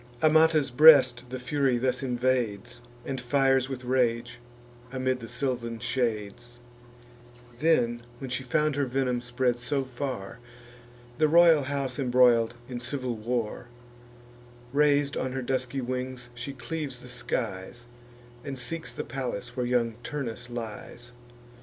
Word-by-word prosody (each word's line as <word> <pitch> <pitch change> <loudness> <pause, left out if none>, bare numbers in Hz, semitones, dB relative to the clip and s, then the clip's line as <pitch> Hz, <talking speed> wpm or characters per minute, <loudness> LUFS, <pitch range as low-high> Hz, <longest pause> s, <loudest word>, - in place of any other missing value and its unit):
Amata's 155 -3 +4
breast 130 -3 +7
the 130 - -4
Fury 135 -1 +1
thus 125 +1 0
invades, 120 -3 -1 0.2
And 130 -2 -4
fires 135 +1 +2
with 130 -2 -5
rage, 120 -1 0 0.5
amid 130 -1 -1
the 115 - -8
sylvan 120 -2 -3
shades; 120 0 -3 1.0
Then, 125 -7 +2 0.2
when 135 -2 -7
she 125 - -2
found 150 +3 +1
her 140 -2 +1
venom 125 -1 0
spread 120 0 0
so 135 +3 -1
far, 125 -5 -5 0.8
The 155 - +5
royal 165 -1 +6
house 135 -2 -3
embroil'd 120 -3 +4
in 125 -2 -5
civil 125 0 -3
war, 115 +1 -3 1.1
Rais'd 145 -1 +3
on 130 -1 -2
her 130 -1 -3
dusky 130 +1 -2
wings, 125 0 -4
she 120 +4 -6
cleaves 135 0 -5
the - - -10
skies, 120 -3 -4 0.6
And 135 -2 -5
seeks 160 +5 -5
the - - -5
palace 125 -4 -5
where 125 -2 -1
young 120 -2 0
Turnus 125 -5 -5
lies. 120 +1 -7
125 Hz, 130 wpm, -27 LUFS, 120-135 Hz, 1.1 s, breast